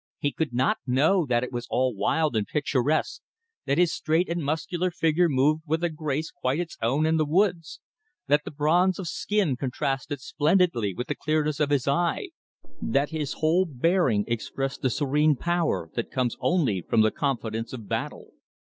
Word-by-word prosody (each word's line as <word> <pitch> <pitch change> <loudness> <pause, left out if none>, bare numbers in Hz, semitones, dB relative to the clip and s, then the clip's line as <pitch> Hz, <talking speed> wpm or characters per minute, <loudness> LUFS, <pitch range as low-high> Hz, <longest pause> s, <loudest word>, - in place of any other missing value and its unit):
He 145 - -1
could 160 -1 -2
not 125 +2 +1
know 150 +7 +3
that 120 -1 +1
it 125 - -5
was 120 -1 -5
all 130 -1 +1
wild 155 +6 +1
and 105 -2 0
picturesque, 150 - 0 0.5
that 140 - +1
his 175 -1 +3
straight 160 +3 0
and 170 -1 -2
muscular 165 +5 -1
figure 170 0 +2
moved 150 +3 +2
with 160 +3 0
a 175 - +1
grace 155 0 -3
quite 135 -2 -2
its 175 -1 -4
own 135 +7 +1
and 160 0 +2
the - - +3
woods', 170 0 0 0.5
that 145 +1 +2
the - - -6
bronze 165 +5 +2
of 190 - -5
his 170 - -4
skin 205 -10 0
contrasted 135 +2 -3
splendidly 145 - +1
with 125 - -3
the - - -2
clearness 155 -1 -1
of 150 -2 +1
his 140 -3 +1
eye, 170 - 0 0.5
that 140 +3 0
his 155 -3 -3
whole 170 +4 +2
bearing 140 - +2
expressed 135 +4 -3
the 130 - +2
serene 145 +5 +2
power 170 - -1
that 120 - -3
comes 125 -3 -1
only 135 - +1
from 110 +6 +2
the 110 0 +3
confidence 115 -5 -2
of 115 -5 -8
battle. - - -4
150 Hz, 185 wpm, -26 LUFS, 130-165 Hz, 0.5 s, know